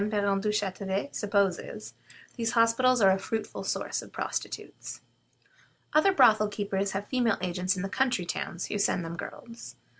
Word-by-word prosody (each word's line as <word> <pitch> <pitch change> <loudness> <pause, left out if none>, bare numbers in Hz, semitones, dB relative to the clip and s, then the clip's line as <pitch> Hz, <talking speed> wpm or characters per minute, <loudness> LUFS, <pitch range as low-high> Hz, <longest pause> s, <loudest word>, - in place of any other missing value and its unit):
Parent 200 -2 +1
Duchatelet 200 +1 -1
supposes, 200 -3 -1 0.4
these 230 -1 -1
hospitals 235 +2 +4
are 195 -1 +7
a 190 - +2
fruitful 220 +3 -4
source - - -2
of - - -13
prostitutes. - - -5 0.9
Other 310 +6 +5
brothel 220 - +5
keepers 200 -1 -2
have 200 +1 -3
female 245 -4 +1
agents 180 +1 -1
in 180 - -3
the - - -1
country 245 -4 0
towns, 175 0 -3
who 205 - -3
send 185 -4 +1
them 165 +1 -5
girls. 230 +6 -9
205 Hz, 150 wpm, -28 LUFS, 190-230 Hz, 0.9 s, are